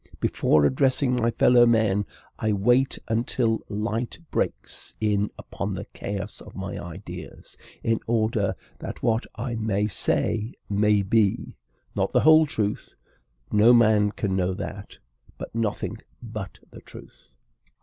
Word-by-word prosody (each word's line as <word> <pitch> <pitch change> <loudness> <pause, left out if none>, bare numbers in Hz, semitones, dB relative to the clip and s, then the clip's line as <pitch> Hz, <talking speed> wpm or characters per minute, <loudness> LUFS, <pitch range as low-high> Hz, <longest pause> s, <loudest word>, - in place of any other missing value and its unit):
Before 75 -1 +3
addressing 130 - +2
my 120 -1 +2
fellow 120 +1 +5
men, 105 -4 +2 0.3
I 110 -1 +1
wait 120 +7 +2
until 115 0 0
light 110 +3 -2
breaks - - -3
in 105 -1 +1
upon - - -5
the - - -5
chaos 100 0 -5
of - - -13
my 95 -1 -5
ideas, 85 0 -9 0.3
in 115 -1 +1
order 115 -1 +1 0.2
that - - -7
what 115 -1 +1
I 120 0 -4
may 110 -2 0
say 110 +3 0
may 105 0 +3
be, 105 0 +1 0.4
not - - 0
the - - +4
whole 155 0 +6
truth 105 -7 -3 0.6
(no 110 +4 +6
man 110 -3 +5
can 100 -2 -2
know 95 0 0
that), 100 0 -7 0.4
but - - -8
nothing 110 -2 -2 0.2
but 110 -5 -7
the - - -12
truth. - - -14
110 Hz, 135 wpm, -25 LUFS, 100-115 Hz, 0.6 s, whole